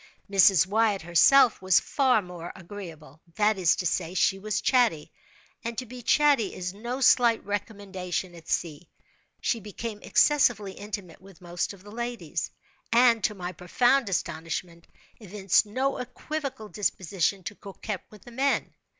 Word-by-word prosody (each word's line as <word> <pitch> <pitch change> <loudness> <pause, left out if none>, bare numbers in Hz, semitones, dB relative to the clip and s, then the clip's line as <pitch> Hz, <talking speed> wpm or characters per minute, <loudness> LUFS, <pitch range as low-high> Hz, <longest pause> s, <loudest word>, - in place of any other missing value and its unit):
Mrs. 195 -4 +5
Wyatt 205 -1 +1
herself 225 - +5
was 185 -1 +4
far 255 -6 +2
more 175 -1 -8
agreeable. 165 -6 -11
That 210 -1 +2
is 175 -3 +4
to 180 - -4
say, 175 +1 -1
she 195 +1 +2
was 210 +1 -2
chatty; 235 - +2 0.5
and 230 -1 -5
to 255 - -3
be 250 +1 -10
chatty 280 -4 +3
is 180 0 -4
no 240 +6 -5
slight 240 -3 +4
recommendation 195 -3 -4
at 165 -2 -14
sea. 165 0 -3 0.5
She 235 - 0
became 210 +1 -7
excessively 245 -9 +3
intimate 200 -3 -8
with 190 -2 -16
most 175 -1 -3
of 190 -1 -16
the 205 - -12
ladies; 240 +1 -4 0.4
and, 235 -2 +4
to 210 - -1
my 180 -2 -5
profound 240 +8 +1
astonishment, 170 -1 -4 0.3
evinced 200 -1 +1
no 265 +6 -1
equivocal 265 -1 -5
disposition 195 -2 -1
to 205 - -5
coquet 200 0 -6
with 210 -3 -16
the 240 - -12
men. 270 +3 0
205 Hz, 150 wpm, -27 LUFS, 180-235 Hz, 0.5 s, Mrs